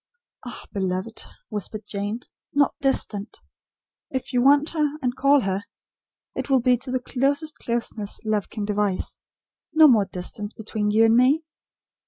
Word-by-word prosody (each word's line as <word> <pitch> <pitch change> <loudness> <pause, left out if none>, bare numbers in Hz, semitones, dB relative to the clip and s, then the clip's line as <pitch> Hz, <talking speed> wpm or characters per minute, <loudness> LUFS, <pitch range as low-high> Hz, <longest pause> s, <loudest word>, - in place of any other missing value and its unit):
"Ah, - - -8
beloved!" 190 +2 -3 0.3
whispered 210 +1 -3
Jane, 205 +3 -4 0.3
"not 285 -1 +3
'distant.' 220 -6 0 0.7
If 260 0 -4
you 245 - +3
want 285 +3 +5
her, 300 -2 0
and 250 -3 -1
call 280 0 +4
her, 195 -1 -1 0.7
it - - -4
will 265 -1 +5
be 250 +1 +4
to 255 +2 -7
the 255 0 0
closest 280 +5 -1
closeness 230 -3 -2
love 215 -2 0
can 210 -2 -4
devise. 205 -2 -1 0.5
No 315 0 +8
more 225 -7 +5
distance 200 +3 -3
between 215 -1 -3
you 220 +2 +5
and 225 0 +4
me." 265 +6 +4
230 Hz, 150 wpm, -24 LUFS, 210-270 Hz, 0.7 s, No